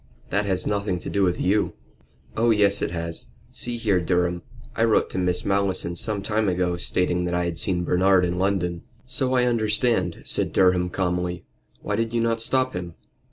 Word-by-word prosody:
"That 100 +2 +1
has 95 -2 +1
nothing 100 -3 -1
to - - -6
do 100 - 0
with 90 -2 +1
you." 100 +3 +1 0.6
"Oh 115 +1 +2
yes, 100 -2 +3
it - - 0
has. 85 -1 -5 0.2
See 120 -1 -3
here, 105 -5 +1
Durham, 90 0 0 0.3
I 115 - +1
wrote 115 -2 +2
to 95 - -2
Miss 90 -1 0
Malleson 95 -3 0
some 105 +1 -2
time 105 0 0
ago, 90 -1 0
stating 90 0 0
that 90 0 -1
I 90 0 0
had 85 -1 -3
seen 90 -1 +2
Bernard 90 +1 +3
in 90 +1 -2
London." 90 -3 0 0.2
"So 130 0 -1
I 125 - +3
understand," 110 -5 0
said - - 0
Durham, 90 -1 +3
calmly. 90 -1 -2 0.4
"Why 105 0 -2
did 115 +1 -1
you - - +2
not 115 0 0
stop 130 +2 +1
him?" 90 -2 -6
95 Hz, 190 wpm, -24 LUFS, 90-110 Hz, 0.6 s, yes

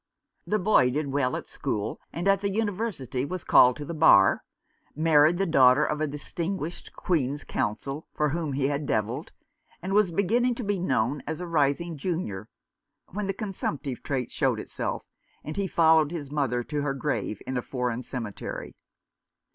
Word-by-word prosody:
The 215 - +2
boy 185 -10 +4
did 145 +2 -2
well 135 -2 +1
at - - -5
school, 105 -1 -3
and 175 +4 -3
at 195 0 +4
the 200 - 0
University, 200 - -2
was 180 +5 -4
called 125 0 +6
to 145 - -7
the 170 - -5
Bar, 150 -12 +5 0.5
married 155 +1 +4
the 195 - +1
daughter 140 -3 +5
of 150 0 -2
a 155 - +1
distinguished 165 +4 -5
Queen's 145 -5 -1
Counsel, 135 +8 -3
for 150 -1 0
whom 155 -1 -2
he 135 0 +1
had 145 0 -2
devilled, 115 +8 -1 0.5
and 190 +2 -4
was 205 -3 +4
beginning 235 +7 +2
to 245 - -5
be 205 -2 -1
known 130 -4 0
as 160 +2 -3
a 180 - -4
rising 160 0 0
junior, 135 - -3 0.6
when 205 +1 -3
the - - +1
consumptive 160 - -4
taint 130 -4 -3
showed - - +1
itself, - - -4 0.4
and 155 - -6
he 200 -1 -1
followed 160 -3 +4
his 150 -4 -6
mother 130 -5 0
to 150 +3 -3
her 140 -1 -1
grave 120 -7 -2
in 130 - -4
a 125 - 0
foreign 125 -1 -2
cemetery. 115 -5 -6
150 Hz, 170 wpm, -27 LUFS, 130-180 Hz, 0.6 s, called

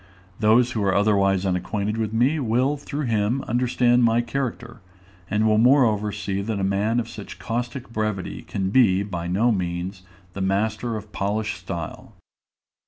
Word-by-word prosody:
Those 115 +3 +4
who 110 -3 -1
are 95 -1 +2
otherwise 100 -2 +2
unacquainted 100 +3 -1
with 110 -2 -2
me 125 +8 +2
will 130 +3 +1
through 145 0 -4
him 115 +3 0
understand 125 0 +2
my 115 0 +4
character, 120 -1 -4 0.5
and 105 +2 +1
will 110 -1 +4
moreover 115 -5 +4
see 100 -1 -3
that 105 0 -3
a - - -1
man 100 +5 +1
of 120 - -3
such - - -9
caustic 120 +2 -4
brevity 105 -4 -3
can 95 -1 -3
be, 100 -6 +4
by 90 -4 -5
no 105 +7 +2
means, 90 -1 -3 0.3
a 95 - -5
master 110 +4 0
of 105 0 -10
polished 105 +2 -2
style. 85 -3 -7
110 Hz, 160 wpm, -23 LUFS, 100-120 Hz, 0.5 s, Those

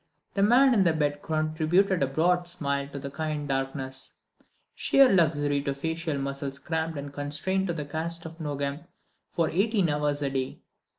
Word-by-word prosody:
The 200 - 0
man 250 +6 +6
in 210 - +4 0.2
bed 145 -1 0
contributed 160 +4 +1
a 135 - +3
broad 175 +5 +1
smile 140 -5 -2
to 140 - -8
the 140 0 -6
kind 150 0 -3
darkness—sheer 135 - -1
luxury 145 -5 +2
to 140 -1 -2
facial 160 +1 -2
muscles 140 0 -3
cramped 160 +1 -2
and 140 0 -6
constrained 155 +7 -1
to 170 - -1
the 150 -3 -4
cast 165 +3 -3
of 160 +1 -9
Nogam 145 0 -3 0.4
for 165 -2 0
eighteen 200 0 +2
hours 145 0 0
a 140 - 0
day. 130 -1 -3
155 Hz, 160 wpm, -27 LUFS, 140-170 Hz, 0.4 s, man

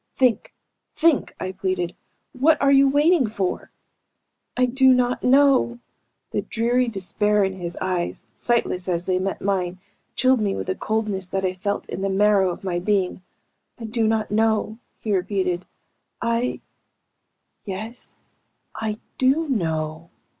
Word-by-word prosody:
"Think! 250 -4 +2 0.4
Think!" 325 -3 +2
I 185 - -3
pleaded. 185 -2 -2 0.4
"What 295 +4 +3
are 275 0 +3
you 275 0 +6
waiting 295 0 +4
for?" 200 -4 -3 0.9
"I 255 - +4
do 260 +1 +4
not 250 0 +1
know!" 265 -2 +4 0.5
The - - 0
dreary 240 +2 0
despair 210 0 +1
in 190 0 0
his 175 -2 -6
eyes, 185 -2 -2
sightless 195 -6 0
as 175 0 -1
they 185 -1 +1
met 195 +1 -3
mine, 185 -2 -1 0.4
chilled 255 -2 +3
me 200 -2 0
with - - -4
a 185 - 0
coldness 210 -4 -2
that 195 0 -1
I 185 - 0
felt 200 +2 -3
in - - -5
the 195 - 0
marrow 195 -1 +3
of 175 - -6
my 180 -2 -1
being. 190 -1 0 0.6
"I 235 - -9
do 225 0 0
not 220 -1 0
know," 220 0 +1 0.2
he 210 -3 -1
repeated. 185 -1 -1 0.5
"I... 235 +1 -1 1.0
Yes, 215 +5 -6 0.6
I 215 -1 -3 0.2
do 275 +5 +3
know!" 160 - -2
210 Hz, 145 wpm, -23 LUFS, 185-245 Hz, 1.0 s, you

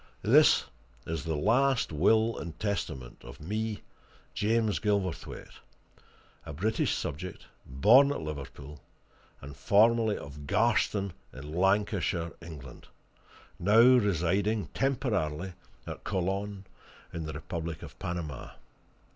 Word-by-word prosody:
"This - - +5 0.4
is 80 -1 -4
the 80 -1 -1
last 125 - +2
will 110 +9 +3
and 85 -1 -8
testament 85 - -4
of - - -11
me, 105 +5 -3 0.5
James 110 0 +1
Gilverthwaite, 100 -5 -3 0.8
a - - -8
British 105 +9 0
subject, 85 +6 -5 0.2
born 115 - +5
at - - -2
Liverpool, 75 -1 -8 0.6
and 70 +1 -9
formerly 110 - +3
of 70 0 -9
Garston, 105 -2 +1 0.2
in 70 +4 -9
Lancashire, 95 -2 +1
England, 75 -7 -11 0.7
now 105 +5 +5
residing 105 -3 +3
temporarily 100 - -1 0.3
at - - -7
Colon, 100 +1 -2 0.5
in 80 -2 -4
the 75 - -5
Republic 80 +2 -5
of - - -11
Panama. 85 -7 -5
95 Hz, 105 wpm, -29 LUFS, 75-110 Hz, 0.8 s, This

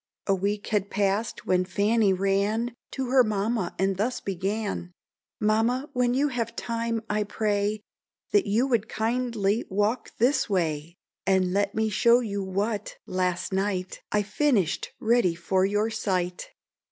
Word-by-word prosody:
A 195 - +3
week 200 +2 -1
had 205 -2 0
pass'd, 200 +2 0
when 185 0 +2
Fanny 205 +3 +2
ran 200 +5 +1 0.2
To 260 -2 -3
her 260 -1 +6
mamma, 215 -2 -1
and 190 0 +1
thus 235 +5 -1
began: 195 -1 -3 0.5
"Mamma, 230 +6 +1
when 250 -1 +2
you 290 +2 +2
have 230 -3 -3
time, 230 -1 -2
I 210 0 0
pray, 205 0 -1 0.5
That 205 - +3
you 220 +6 +2
would 235 -5 0
kindly 225 -2 0
walk 210 +5 0
this 250 +1 +2
way, 165 -3 -1 0.3
And 185 -1 +3
let 200 +1 0
me 220 0 +1
show 235 +4 +5
you 205 -4 -3
what, 200 +3 -2
last 185 0 -1
night, 190 -1 -1
I 210 0 +2
finish'd 210 - +1
ready 225 -6 +3
for 185 +2 +1
your 210 +2 0
sight." 180 -4 -2
205 Hz, 145 wpm, -26 LUFS, 195-230 Hz, 0.5 s, her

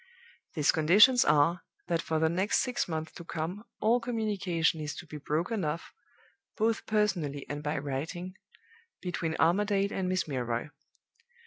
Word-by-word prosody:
"These 150 -3 +4
conditions 210 +11 +6
are, 150 +4 +3 0.2
that 170 -1 0
for 160 - -1
the 160 +1 +3
next 185 +6 +1
six 250 -2 -1
months 160 -2 -4
to 170 - -10
come 170 +5 -4 0.2
all 230 +3 +3
communication 200 -9 0
is 150 -1 -4
to - - -8
be 155 -2 -8
broken 170 +8 -1
off, 155 +2 -3 0.6
both 225 0 0
personally 175 -10 0
and 145 0 -4
by 150 +1 -2
writing, 155 +7 -4 0.6
between 170 -3 -3
Armadale 200 +4 +2
and 185 -1 -1
Miss 185 -2 0
Milroy. 125 -1 -2
170 Hz, 145 wpm, -30 LUFS, 155-200 Hz, 0.6 s, conditions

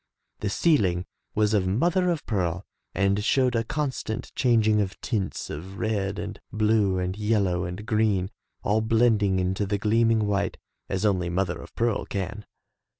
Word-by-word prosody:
The 105 - -1
ceiling 95 - +2 0.3
was 105 0 +2
of 95 -3 +2
mother 175 - +2
of 165 -4 -1
pearl 95 -3 -1 0.3
and 100 +1 +2
showed 125 +2 +2
a 115 - +2
constant 130 -4 -3
chang 120 -4 +3
ing 105 -1 +4
of 95 -1 -4
tints 105 -6 -3
of 95 +6 -7
red 100 -3 -1
and 105 +1 -5
blue 105 -3 +2
and 90 0 -2
yellow 100 -4 +1
and 90 +4 -6
green, 105 -4 +1 0.3
all 105 +2 +2
blending 110 -3 +3
into 95 +2 0
the 100 +1 0
gleaming 110 +1 +2
white, 100 -1 0 0.3
as 95 +2 -1
only 90 -4 +1
mother 90 +1 -1
of - - -13
pearl 115 -2 0
can. 100 +1 -4
105 Hz, 160 wpm, -26 LUFS, 95-110 Hz, 0.3 s, ing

